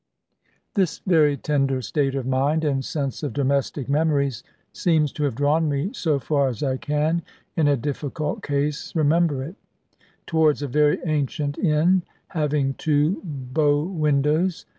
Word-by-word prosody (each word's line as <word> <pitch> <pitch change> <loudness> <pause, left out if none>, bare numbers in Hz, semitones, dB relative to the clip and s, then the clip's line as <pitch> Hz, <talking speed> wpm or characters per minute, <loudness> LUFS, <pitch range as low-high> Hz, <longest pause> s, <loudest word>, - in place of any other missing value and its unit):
This 190 -5 +1
very 155 -5 +4
tender 135 -2 0
state 140 +1 0
of 135 -2 -2
mind, 140 +5 +1
and 135 -3 0
sense 140 -2 -3
of 145 - -3
domestic 140 0 0
memories, 140 -4 +1 0.3
seems 155 -5 +2
to 150 - -4
have 135 -5 -1
drawn 150 +4 +2
me 145 +7 -1
(so 155 -4 0
far 140 0 +1
as 120 -2 -4
I 130 -2 0
can, 150 +4 0 0.3
in 160 -3 +2
a 145 -1 +3
difficult 145 +3 -3
case, 145 +2 -2
remember 155 -2 +2
it) 170 +9 -8 0.7
towards 155 -3 +2
a - - -2
very 150 +3 +3
ancient 145 -2 -1
inn 175 +2 +3 0.3
having 150 -4 0
two 155 +4 +1
bow 145 -1 0
windows. 155 0 0
150 Hz, 145 wpm, -23 LUFS, 140-155 Hz, 0.7 s, very